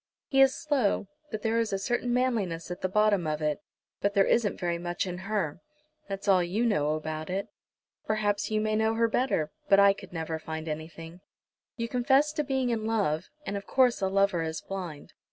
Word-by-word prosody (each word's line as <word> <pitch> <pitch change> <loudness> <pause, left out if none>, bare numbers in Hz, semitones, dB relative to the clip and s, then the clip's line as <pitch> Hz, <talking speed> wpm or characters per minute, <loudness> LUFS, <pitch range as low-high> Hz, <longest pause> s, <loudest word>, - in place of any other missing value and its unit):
He 270 -1 +4
is 270 -1 +6
slow, 265 - 0 0.2
but 215 -4 -5
there 225 0 +2
is 225 -1 0
a 195 - 0
certain 240 +5 -1
manliness 215 -10 0
at 180 - -6
the 185 - 0
bottom 205 -3 +3
of 155 0 -1
it. 150 -2 -1 0.4
But 200 0 0
there 195 -1 +5
isn't 225 -3 +1
very 175 -2 -1
much 175 +1 -2
in 180 -1 -5
her!" 195 -6 -2 0.5
"That's 195 +1 -5
all 190 -2 +5
you 190 +7 0
know 150 -9 +2
about 155 +1 -5
it." 190 +2 -2 0.6
"Perhaps 210 -1 0
you 215 -1 +1
may 215 0 0
know 220 +1 +2
her 230 0 +3
better, 225 - 0 0.2
but 195 - +7
I 200 0 +7 0.2
never 160 -1 -3
could - - -22
find 160 0 -4
anything. 165 +2 -7 0.6
You 230 -1 -2
confess 265 +5 +3
to 305 -1 0
being 265 -3 0
in 220 -1 -1
love, 195 -7 0 0.2
and 200 - -3
of 200 0 -5
course 255 -4 +3
a 190 - +2
lover 195 -2 +2
is 160 -1 -3
blind. 180 -7 -7
200 Hz, 205 wpm, -28 LUFS, 170-225 Hz, 0.6 s, but